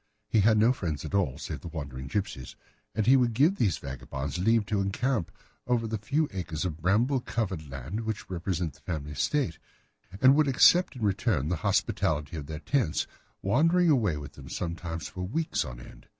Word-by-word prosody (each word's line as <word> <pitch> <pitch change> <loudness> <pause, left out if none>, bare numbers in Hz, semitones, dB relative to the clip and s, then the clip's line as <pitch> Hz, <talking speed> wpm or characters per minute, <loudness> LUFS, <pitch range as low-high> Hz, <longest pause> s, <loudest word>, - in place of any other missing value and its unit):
He 110 - +2
had 110 +2 +5
no 115 +4 +5
friends 80 - -3
at - - -7
all 90 -10 +1
save - - -6
the - - -8
wandering 70 -5 -6
gipsies, 70 -5 -3 0.4
and 110 - +1
he 130 - +7
would 120 -4 +2
give 155 - +4
these 100 -8 +2
vagabonds 70 +2 -5
leave 115 +3 +3
to 100 0 0
encamp 100 +1 -1 0.4
upon 115 -2 +1
the 110 -1 -2
few 145 +9 +1
acres 85 -4 -3
of 80 -3 -4
bramble 115 - +2
covered 95 - -3
land 70 - -5
which 110 -2 -4
represent 85 -3 -2
the 75 - -20
family 75 -2 -4
estate, 85 - 0 0.6
and 130 +3 +7
would 150 0 +4
accept 170 +7 +5
in 120 - -6
return 100 - +1
the 90 - 0
hospitality 75 0 0
of 75 -3 -6
their 80 0 -5
tents, 130 - +1 0.4
wandering 165 - +4
away 105 - +2
with 75 -1 -8
them - - -11
sometimes 85 -2 -4
for 90 - -7
weeks 150 - -1
on - - -8
end. - - -14
95 Hz, 190 wpm, -28 LUFS, 75-120 Hz, 0.6 s, he